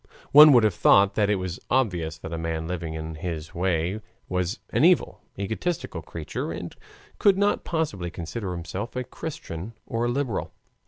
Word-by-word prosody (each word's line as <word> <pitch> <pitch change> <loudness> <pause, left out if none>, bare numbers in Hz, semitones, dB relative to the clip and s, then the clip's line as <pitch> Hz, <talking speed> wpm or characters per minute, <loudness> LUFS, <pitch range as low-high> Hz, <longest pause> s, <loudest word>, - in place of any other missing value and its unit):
One 150 +1 +10
would 120 -3 +6
have 105 -3 +3
thought 100 +3 +5
that 105 -2 +2
it 105 - +3
was 90 -2 -4
obvious 90 -11 0
that 80 - -7
a - - -2
man 80 -1 -2
living 85 -2 -4
in 80 0 -5
this 80 -1 -5
way 90 +3 0 0.3
was 90 0 -1
an - - +2
evil, - - +3 0.2
egoistic 110 - -2
creature 80 -2 -5
and - - -6 0.4
could 200 -2 +5
not 205 +1 +2
possibly 145 - -2
consider 90 +4 -5
himself 90 +7 -5
a 125 - -1
Christian 115 - -7
or 115 +1 -1
a - - +1
liberal. 125 -4 -2
95 Hz, 170 wpm, -25 LUFS, 85-120 Hz, 0.4 s, One